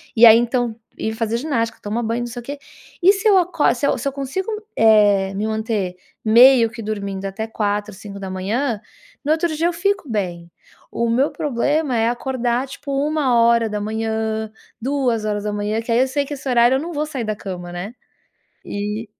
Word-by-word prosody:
E 235 +1 +8
aí, 225 -1 +10
então, 240 -1 0 0.2
ir 220 - -2
fazer 225 0 -1
ginástica; 235 -5 -2
tomar 215 +3 -2
banho 230 +1 -1
e - - -3
não - - -4
sei 240 +1 -7
o - - -16
quê. 285 +2 -6 0.4
E 375 +3 +7
se 395 +1 -1
eu 395 - +6
acor 340 -8 +2
se 265 +3 0
eu - - +1
se - - -3
eu - - 0
consigo, 280 +9 -3 0.3
eh, 205 -3 +4
me 205 +2 -2
manter 220 -4 -2 0.3
meio 235 +1 +7
que 230 0 -9
dormindo 200 -2 -4
até 195 +3 -4
4h, 210 -1 -2
5h, 200 +4 -3 0.4
no 295 - 0
outro 320 0 -1
dia 330 +3 +1
eu 350 - -1
fico 395 +4 0
bem. 175 -6 -3 0.4
O 235 0 -1
meu 260 +5 +2
problema 290 +1 0
é 225 +1 +2
acordar, 245 0 -1
tipo, 280 +1 -8
1h, 225 -6 +1 0.3
2h, 215 -5 -1
que 230 - -5
aí 235 - +3
eu 260 - +3
sei 285 +2 0
que 290 - -6
esse 270 0 -6
horário, 240 +1 +4
eu 265 - 0
não 340 +3 -5
vou 300 0 -1
sair 275 -5 -4
da 215 -1 -2
cama, 180 -3 -7
né. 180 +6 -6 0.8
E 210 +2 -3
230 Hz, 190 wpm, -20 LUFS, 210-270 Hz, 0.8 s, aí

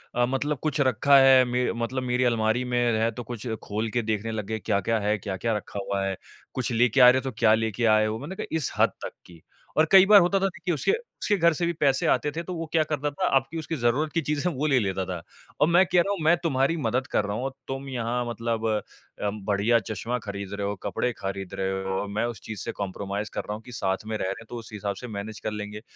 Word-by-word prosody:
अ, 120 - +3
मतलब 135 +3 -1
कुछ 155 -2 -1
रखा 135 +2 +4
है 135 -1 +7
मे 125 0 0
मतलब 130 +2 -2
मेरी 125 0 +1
अलमारी 115 0 +1
में 125 0 -1 0.2
है 115 +1 +2
तो 120 +2 -7
कुछ 120 +1 -7 0.2
खोल 110 +2 -2
के 120 +1 +1
देखने 110 0 -2
लग 110 -2 -3
गए 110 +1 -3
क्या-क्या 110 +2 0
है, 105 +1 0
क्या-क्या 100 +3 -2
रखा 100 0 -7
हुआ 100 -1 -1
है। 95 -1 -1 0.4
कुछ 130 -1 -2
लेके 120 +2 +3
आ 125 - +10
रहे 130 - +4
हो - - -9
तो 135 - -3
क्या 110 - +5
लेके 110 +1 0
आए 110 0 +3
हो 110 +1 -2
मैंने 160 +8 -7
कहा - - -4
इस 150 - -1
हद - - +5 0.2
तक - - -6
की 85 -2 -15 0.4
और 160 +1 +5
कई 190 0 +9
बार 210 0 +8
होता 190 +3 +2
था 195 - +1 0.3
उसके 155 - +1 0.3
उसके 205 - +3
घर 170 -1 +4
से 170 +3 -1
भी 170 - 0
पैसे 135 -2 +2
आते 150 - +2
थे 170 - -2
तो 180 - -6
वो 165 0 -4
क्या 160 -2 +3
करता 150 -1 -2
था, 185 +6 -2
आपकी 135 +4 +1
उसकी 160 +1 -4
ज़रूरत 130 +6 +1
की 165 - +1
चीज़ें 150 +4 -1
वो 145 +3 -2
ले 135 -3 +4
लेता 95 -2 -1
था। 90 -2 -5 0.4
औ - - +7
मैं 175 +3 +5
कह 180 - +5
रहा 200 - -1
हूँ 200 - -4
मैं 165 +2 +6
तुम्हारी 135 0 +1
मदद 130 -1 -1
कर 105 - +1
रहा 100 +1 -3
हूँ, 135 +2 -2 0.2
तुम 135 +1 -5
यहाँ 120 -1 -2
मतलब 115 -1 -2 0.5
अ, 105 - +1
बढ़िया 105 +3 +1
चश्मा 110 +4 -3
ख़रीद 100 -2 -6
रहे 100 0 -2
हो 100 - -2
कपड़े 125 - -1
ख़रीद 95 -1 -5
रहे 95 0 -2
हो 95 0 -3
और 105 - -4
मैं 105 +3 -1
उस 120 -3 -5
चीज़ 110 -2 -6
से - - -3
कॉम्प्रोमाइज़ 100 +1 -4
कर - - -2
रहा 105 - -5
हूँ 110 - -7
कि 125 - -12
साथ 95 -2 -2
में 110 0 -3
रह - - -3
रहे 95 - -1
हैं 115 - -13
तो 120 - -7
उस 115 - -11
हिसाब 100 -1 -3
से 125 - -8
मैनेज 105 0 -6
कर 110 - -3
लेंगे। 105 0 -6
115 Hz, 260 wpm, -26 LUFS, 105-135 Hz, 0.5 s, आ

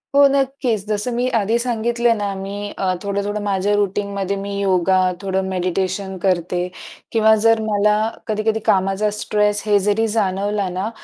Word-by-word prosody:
हो, 280 0 +7
नक्कीच. 270 -6 0
जसं 210 +3 -1
मी 245 +1 0
आधी 220 +2 +1
सांगितले 235 0 +1
ना, 205 -2 -2
मी 200 +1 -5
अ, 185 -1 0
थोडं-थोडं 200 +1 -2
माझ्या 200 0 0
रूटीनमध्ये 200 -1 -1
मी 200 +1 -5
योगा, 190 -1 +2 0.2
थोडं 190 -1 -1
मेडिटेशन 190 +1 -2
करते 180 -1 0 0.5
किंवा 220 -1 +4
जर 225 0 +5
मला 210 -1 +2 0.3
कधी-कधी 215 0 0
कामाचा 195 +2 +2
स्ट्रेस 210 -1 +1
हे 210 -1 +4
जरी 210 +3 +1
जाणवला 205 -1 0
ना, 185 +4 -3
205 Hz, 145 wpm, -20 LUFS, 195-220 Hz, 0.5 s, हो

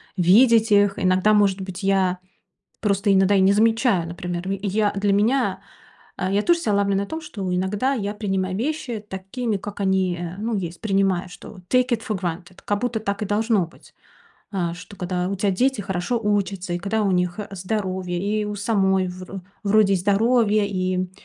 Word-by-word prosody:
видеть 220 +5 +5
их. 205 -1 +4
Иногда, 185 +3 +3
может 200 -2 +3
быть, 190 0 -7
я 190 -2 +2 0.6
просто 200 -1 +1
иногда 195 +1 +4
и - - +4
не 190 +1 +5
замечаю, 225 -4 +2
например. 175 +1 -5 0.2
Я 205 +1 +1
для 200 0 +1
меня, 230 +7 +1 0.6
а, 185 +1 -2
я 200 - +3
тоже, 340 +4 +3
ся, 215 - 0
ловлю 200 -1 +2
на 200 - 0
том, 320 - -5
что 195 - -4
иногда 205 +9 0
я 205 -5 -2
принимаю 190 -3 -2
вещи 240 -4 -3
такими, 205 +3 -3
как 205 +1 -8
они, 190 -2 +1
э, 175 +1 -5
ну, 220 +1 -2
есть. 170 -3 -5
Принимаю, 195 -3 +1
что 180 +3 -12
take 255 0 +3
it 235 -2 +1
for 215 -4 -1
granted. 175 0 -5
Как 205 0 -1
будто 245 -2 -1
так 200 -2 -3
и - - -1
должно 210 -2 +1
быть, 165 - -20 0.6
э, 175 -4 -1
что 180 +3 -12
когда 180 -1 -2
у 200 - -2
тебя 200 +1 0
дети 250 +4 +1
хорошо 190 +5 -2
учатся, 200 -4 -1
и 175 - -1
когда 200 +4 -1
у 200 - +1
них, 180 0 0
э, 210 - -5
здоровье, 185 -2 -3
и 210 +3 -1
у 210 - -4
самой, 190 -3 +1
вр 185 +1 -8 0.2
вроде 205 -1 +4
и - - +4
здоровье, 210 +2 +2
и, 185 -1 -1
200 Hz, 190 wpm, -23 LUFS, 185-215 Hz, 0.6 s, видеть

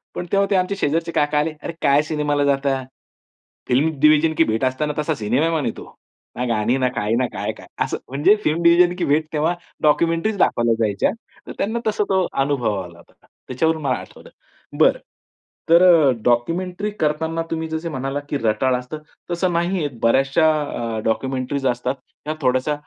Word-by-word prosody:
पण 180 - -4
तेव्हा 200 0 +2
ते - - +3
आमचे 185 +2 +1
शेजारचे 165 -2 -1
काका 150 -1 +1
आले, 155 +2 0
"अरे 170 - -4
काय 140 +1 +4
सिनेमाला 150 -2 -1
जाताय? 135 -2 0 0.8
फिल्म 140 +6 +3
डिव्हिजन 155 +1 +5
की 165 - +6
भेट 110 +3 -1
असतं 130 +4 -1
ना 150 - -2
तसा 155 +1 0
सिनेमा 125 +9 0
म्हणे 150 -8 0
तो, - - -8 0.5
ना 125 +1 -2
गाणी 115 +3 +1
ना 130 -1 +1
काय 110 -1 -1
ना 130 - +2
काय-काय?" - - -5 0.2
असं - - -3
म्हणजे 145 +10 +4
फिल्म 160 +3 0
डिव्हिजन 175 +1 +5
की 175 - -1
भेट 155 +2 +1
तेव्हा 160 +3 +1 0.3
डॉक्युमेंटरी 165 +6 +2
दाखवल्या 120 -8 +2
जायच्या, 105 -3 +1 0.4
तर - - -6
त्यांना 225 +4 -1
तसा 210 -1 +1
तो 190 -2 +2 0.2
अनुभव 120 -9 -1
आला 85 -2 -11
होता. - - -21 0.3
त्याच्यावरून 160 +5 0
मला 130 -3 +1
आठवलं. - - -13 0.5
बरं, - - +4 0.7
तर 170 +2 +7
अ, 165 -6 +6
डॉक्युमेंटरी 175 - 0
करतांना 160 +2 -1
तुम्ही 160 0 -2
जसं 160 +1 -4
म्हणालात, 135 +1 -3
की 145 - -1
रटाळ 115 +2 +1
असतं, 125 +5 -7 0.3
तसं 175 +1 0
नाहीये 170 -2 0 0.2
बऱ्याचशा 135 +7 +3
अ, 115 -6 -4
डॉक्युमेंटरीज 130 +3 -1
असतात 125 +2 -1 0.3
ह्या 155 +1 -3
थोड्याशा 130 +3 +1
150 Hz, 175 wpm, -21 LUFS, 130-165 Hz, 0.8 s, तर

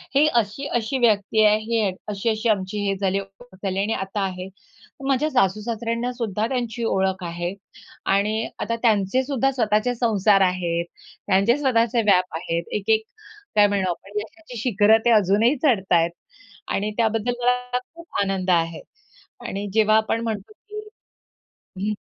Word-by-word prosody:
ही 285 +2 +6
अशी-अशी 240 +3 -2
व्यक्ती 220 -2 +3
आहे. 210 0 +5
ही 220 -2 0 0.2
अशी-अशी 215 +2 -1
आमची 200 -1 0
हे 195 - +1
झाली 195 0 0
आणि 195 - -6
ओळख 245 -5 -16
झाली 195 -1 -1
आणि 205 +3 0
आता 195 +2 -3
आहे. 185 -1 -5 0.6
माझ्या 275 +3 +2
सासू-सासऱ्यांना 230 +1 0
सुद्धा 220 -3 -2
त्यांची 240 -2 -3
ओळख 190 -2 0
आहे. 175 +1 -3 0.5
आणि 210 +3 +1
आता 230 - -1
त्यांचे 220 +2 +2
सुद्धा 270 -1 0
स्वतःचे 225 -1 +1
संसार 210 -4 +3
आहेत, 175 -2 0 0.4
त्यांचे 200 +7 +3
स्वतःचे 240 -4 +2
व्याप 185 -5 +2
आहेत. 165 0 -2
एक-एक, 220 +2 +1 0.5
काय 205 -1 +6
म्हणू 200 -2 0
आपण 195 +4 -4
यशाची 250 +4 -10
शिखरं 220 -2 +4
ते - - +5
अजूनही 215 +4 +4
चढत 215 -11 +2
आहेत. 170 0 +3 0.6
आणि 210 +2 -1
त्याबद्दल 225 +1 +1
मला 250 0 0 0.2
खूप 335 0 -13
आनंद 195 -2 -1
आहे. 165 -1 +1 0.7
आणि 200 +1 -4
जेव्हा 215 0 +4
आपण 220 +1 0
म्हणतो, 225 - -4
की 425 0 -10 1.0
हं 215 - 0
215 Hz, 145 wpm, -23 LUFS, 195-235 Hz, 1.0 s, ही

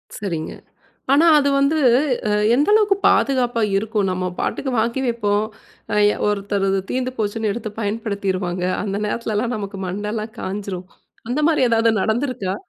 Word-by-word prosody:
சரிங்க. 170 -6 -4 0.6
ஆனா 300 +4 +5
அது 285 -1 +3
வந்து 280 +3 +2 0.5
அ - - +1 0.2
எந்த 290 +4 +2
அளவுக்கு 420 -2 +4
பாதுகாப்பா 245 -3 +2 0.2
இருக்கும்? 210 0 -1
நம்ம 185 0 -2
பாட்டுக்கு 265 - -2
வாங்கி 235 +4 0
வப்போம். 210 -3 0 0.5
அ - - +1 0.2
எ - - -5
ஒருத்தரு 200 -1 0
அது 195 - +1
தீந்து 255 0 -1
போச்சுன்னு 215 0 -1
எடுத்து 215 0 -5
பயன்படுத்திருவாங்க. 200 -4 -2 0.2
அந்த 200 -1 -2
நேரத்திலலாம் 230 +2 -2
நமக்கு 200 -1 -6
மண்டைலாம் 210 +3 -4
காய்ஞ்சுரும். 190 -2 -5 0.4
அந்த 255 +5 0
மாரி 310 -5 +2
எதாவது 230 0 +3
நடந்த்துருக்கா? 225 -4 -1
215 Hz, 140 wpm, -21 LUFS, 200-245 Hz, 0.6 s, ஆனா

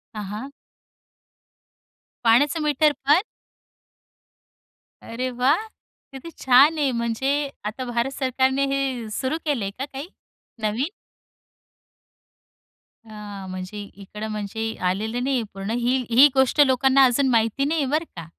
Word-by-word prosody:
हां, 210 - -4
हां. 215 +8 -7 1.7
पाण्याचं 290 +8 +4
मीटरपण? 295 -1 +1 1.9
अरे 250 +3 -4
वाह! 280 - +1 0.4
किती 270 +5 -9
छान 270 +5 +5
आहे, 280 -3 +2
म्हणजे 265 +5 -1 0.2
आता 230 +5 -4
भारत 240 +2 -1
सरकारने 265 +1 0
हे 260 -5 -2
सुरू 265 +8 -2
केलंय 230 -10 -1
का 260 +7 -5
काही 275 +3 -8 0.6
नवीन? 225 +8 0 2.2
हां, 205 -2 -8
म्हणजे 185 +3 -6 0.2
इकडं 210 +3 -7
म्हणजे 210 +1 -4 0.3
आलेलं 220 +6 -2
नाहीये 260 -3 0
पूर्ण. 195 +2 -5
ही, 245 +2 +1
ही 255 +5 +7
गोष्ट 265 +3 +3
लोकांना 265 +1 +4
अजून 260 +2 +2
माहिती 230 +4 +1
नाही 310 +1 0
आहे, 270 - -1
बरं 310 +3 +1
का? 165 -2 -7
255 Hz, 120 wpm, -23 LUFS, 220-275 Hz, 2.2 s, ही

